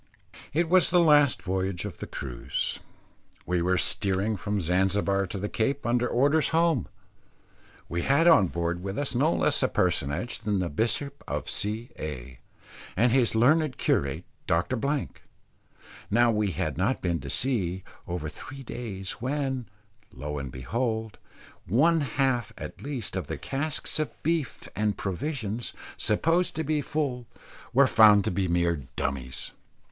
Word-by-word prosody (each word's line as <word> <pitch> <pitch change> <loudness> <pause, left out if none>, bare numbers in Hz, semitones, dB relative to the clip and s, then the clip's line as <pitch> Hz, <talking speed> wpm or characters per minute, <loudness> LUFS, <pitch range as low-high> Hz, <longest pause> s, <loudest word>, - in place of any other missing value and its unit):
It 165 +3 +1
was 180 +1 +5
the 180 - +4
last 150 -5 +5
voyage 95 0 -2
of 100 -6 -7
the - - -5
cruise. 65 -3 -3 0.7
We 90 -1 0
were 90 +2 +2
steering 100 +3 0
from 100 +2 -2
Zanzibar 95 +2 +1
to 100 - -5
the 100 +2 -2
Cape, 135 +7 -1
under 120 +1 +2
orders 145 +6 +3
home. 165 - +2 1.0
We 85 +1 -2
had 145 - +3
on 130 - +7
board 85 +1 -2
with 95 +2 -4
us 145 -2 -1
no 140 +7 +3
less - - +1
a - - +3
personage 75 - -1
than 105 -2 -1
the 90 -2 -1
bishop 115 - -1
of 75 -2 -3
C 110 +4 -2
A 65 -5 -6 0.6
and 120 +4 +4
his 120 -3 +3
learned 140 +5 +3
curate, 70 -1 0 0.2
Dr. 85 +9 +1
Blank. 140 +3 -2 0.9
Now 120 +3 +4
we 105 -2 +1
had 80 -2 -2
not 110 +8 0
been 85 -2 0
to 70 +1 -7
sea 95 - 0 0.2
over 85 -3 -3
three 135 - -9
days 100 -6 -5
when, 135 -2 -2 0.4
lo 75 +2 -5
and 65 -2 -5
behold! 110 - -2 0.5
one 155 - +4
half, 135 -5 0
at - - -8
least, 130 -9 -4
of 95 -6 -3
the - - -4
casks 150 +3 -2
of 155 - 0
beef 160 -3 -1
and 105 -1 0
provisions, 115 - -3 0.2
supposed 165 +11 +2
to 160 - -1
be 155 0 0
full, 135 -5 -2 0.4
were 140 +3 +6
found 105 -4 +6
to - - 0
be 95 +1 0
mere 85 -4 0
dummies. 65 -2 -3
110 Hz, 150 wpm, -27 LUFS, 90-135 Hz, 1.0 s, on